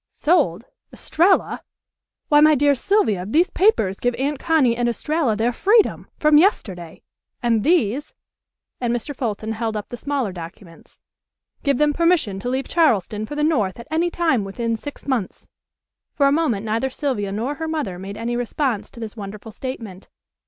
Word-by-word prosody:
"Sold! 270 Hz, -, +1 dB, 0.3 s
Estralla! 365 Hz, +4 st, +1 dB, 0.7 s
Why, 295 Hz, -, +5 dB
my 305 Hz, 0 st, +6 dB
dear 285 Hz, +1 st, +4 dB
Sylvia, 260 Hz, -, +1 dB
these 310 Hz, -, +2 dB
papers 220 Hz, -, +2 dB
give 245 Hz, 0 st, 0 dB
Aunt 280 Hz, +1 st, -2 dB
Connie 295 Hz, -8 st, +2 dB
and 240 Hz, 0 st, 0 dB
Estralla 295 Hz, -1 st, 0 dB
their 230 Hz, +3 st, 0 dB
freedom, 420 Hz, -, +2 dB
from 300 Hz, -1 st, +5 dB
yesterday. 185 Hz, -, -1 dB, 0.4 s
And 230 Hz, -3 st, +2 dB
these," 290 Hz, -, +1 dB, 0.6 s
and 240 Hz, -2 st, -1 dB
Mr. 260 Hz, +5 st, -4 dB
Fulton 220 Hz, -3 st, -3 dB
held 220 Hz, -1 st, -2 dB
up 205 Hz, -, -6 dB
the 245 Hz, -, -6 dB
smaller 275 Hz, -6 st, -2 dB
documents, 170 Hz, 0 st, -12 dB, 0.6 s
"give 280 Hz, -3 st, +1 dB
them 295 Hz, +1 st, +3 dB
permission 335 Hz, -, +1 dB
to 245 Hz, -, -4 dB
leave 265 Hz, +2 st, -2 dB
Charleston 215 Hz, -, +1 dB
for 295 Hz, -, -6 dB
the 295 Hz, -, -1 dB
north 230 Hz, -, +1 dB
at 235 Hz, -, -10 dB
any 335 Hz, +2 st, +1 dB
time 325 Hz, -11 st, +1 dB
within 230 Hz, +4 st, -2 dB
six 285 Hz, +6 st, -9 dB
months." 245 Hz, -9 st, -3 dB, 0.7 s
For 280 Hz, -, +3 dB
a 275 Hz, -, +4 dB
moment 280 Hz, -9 st, 0 dB
neither 225 Hz, +4 st, 0 dB
Sylvia 255 Hz, -8 st, -2 dB
nor 230 Hz, +8 st, -2 dB
her 320 Hz, -, -2 dB
mother 295 Hz, -, -3 dB
made 195 Hz, +2 st, -7 dB
any 235 Hz, +1 st, -2 dB
response 245 Hz, -2 st, -2 dB
to -, -, -14 dB
this 225 Hz, -1 st, -7 dB
wonderful 210 Hz, +1 st, -8 dB
statement. 220 Hz, -6 st, -7 dB
245 Hz, 165 wpm, -21 LUFS, 215-300 Hz, 0.7 s, my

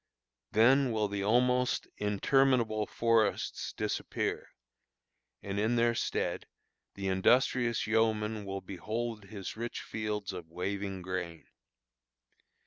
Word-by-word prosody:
Then 130 Hz, +4 st, +5 dB
will 110 Hz, -2 st, +1 dB
the 100 Hz, -1 st, -3 dB
almost 125 Hz, +3 st, +2 dB
interminable 110 Hz, +1 st, +2 dB
forests 115 Hz, -2 st, +1 dB
disappear, -, -, -2 dB, 0.9 s
and 100 Hz, 0 st, -3 dB
in 110 Hz, +3 st, +2 dB
their 120 Hz, 0 st, +3 dB
stead -, -, -2 dB, 0.5 s
the 100 Hz, -1 st, -3 dB
industrious 120 Hz, +5 st, +3 dB
yeoman 110 Hz, -1 st, +1 dB
will 95 Hz, -1 st, -4 dB
behold 110 Hz, +4 st, -4 dB
his 100 Hz, -1 st, -7 dB
rich 115 Hz, +1 st, -4 dB
fields 105 Hz, -2 st, -3 dB
of 85 Hz, -3 st, -8 dB
waving 95 Hz, +2 st, -3 dB
grain. 90 Hz, -3 st, -4 dB
110 Hz, 105 wpm, -31 LUFS, 100-115 Hz, 0.9 s, Then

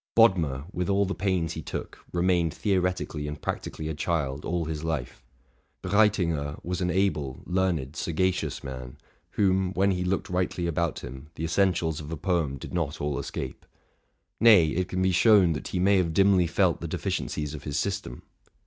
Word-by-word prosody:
Bodmer, 85 Hz, -, +4 dB
with 90 Hz, +2 st, -2 dB
all 100 Hz, 0 st, +3 dB
the 95 Hz, -, -2 dB
pains 90 Hz, -5 st, 0 dB
he 80 Hz, -, -5 dB
took, -, -, -6 dB
remained 85 Hz, -2 st, +1 dB
theoretically 90 Hz, -6 st, -1 dB
and 75 Hz, 0 st, -5 dB
practically 80 Hz, -, -4 dB
a 80 Hz, -, -2 dB
child 75 Hz, -2 st, -2 dB
all 85 Hz, -1 st, -1 dB
his 80 Hz, -1 st, -4 dB
life. 80 Hz, -7 st, -3 dB, 0.6 s
Breitinger 90 Hz, -7 st, +2 dB
was 90 Hz, +2 st, -3 dB
an 90 Hz, -, +1 dB
able, 85 Hz, -9 st, 0 dB
learned, 90 Hz, -7 st, 0 dB
sagacious 90 Hz, +3 st, -1 dB
man, 65 Hz, -2 st, -7 dB, 0.4 s
whom, 95 Hz, -2 st, +2 dB
when 100 Hz, +1 st, +2 dB
he 90 Hz, -1 st, -1 dB
looked 95 Hz, +1 st, -1 dB
rightly 90 Hz, -1 st, -1 dB
about 85 Hz, -1 st, -1 dB
him, 65 Hz, +4 st, -9 dB
the 80 Hz, -, -5 dB
essentials 85 Hz, -2 st, +1 dB
of 75 Hz, 0 st, -8 dB
a 80 Hz, -, -3 dB
poem 80 Hz, -4 st, 0 dB
did -, -, -9 dB
not 80 Hz, -5 st, -2 dB
all 75 Hz, -1 st, -1 dB
escape, 65 Hz, -, -5 dB, 0.8 s
—nay, 105 Hz, -9 st, +7 dB
it 90 Hz, +3 st, -1 dB
can 95 Hz, 0 st, -1 dB
be 95 Hz, -, +3 dB
shown 95 Hz, -2 st, +5 dB
that 75 Hz, -, -5 dB
he -, -, -3 dB
may 100 Hz, +2 st, +4 dB
have 85 Hz, -3 st, 0 dB
dimly 95 Hz, -2 st, +4 dB
felt -, -, +1 dB
the -, -, -3 dB
defi -, -, -3 dB
ciencies 75 Hz, -1 st, -3 dB
of 75 Hz, -, -7 dB
his 75 Hz, -1 st, -2 dB
system. 100 Hz, -11 st, -3 dB
85 Hz, 180 wpm, -27 LUFS, 75-95 Hz, 0.8 s, nay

